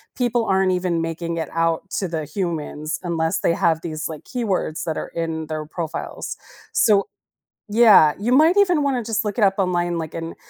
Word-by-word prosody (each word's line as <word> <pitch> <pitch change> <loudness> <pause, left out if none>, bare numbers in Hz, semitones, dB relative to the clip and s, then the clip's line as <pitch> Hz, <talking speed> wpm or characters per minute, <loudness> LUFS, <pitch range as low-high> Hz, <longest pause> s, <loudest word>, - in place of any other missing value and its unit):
people 240 -2 0
aren't 190 -1 +2
even 180 -2 0
making 165 +1 -3
it 160 - -3
out 165 +2 0
to 195 -1 -2
the 160 -2 -3
humans 155 -2 -3
unless 165 -2 0
they - - +2
have 165 -1 +1
these 155 -2 -4
like 155 -2 -8
keywords 200 -10 -2
that 160 - -2
are - - -4
in 160 -1 -4
their 155 -1 -4
profiles. 160 0 -5 0.4
So 200 -2 +3 0.6
Yeah, 210 -9 +6
you 230 +5 -1
might 315 +8 +5
even 360 -7 +4
want 275 -2 +1
to 230 - -9
just 220 +1 0
look 210 +2 -3
it - - +3
up 195 -1 +4
online, 175 -3 0
like, 160 -1 -5
and 165 0 -6
175 Hz, 195 wpm, -22 LUFS, 160-210 Hz, 0.6 s, Yeah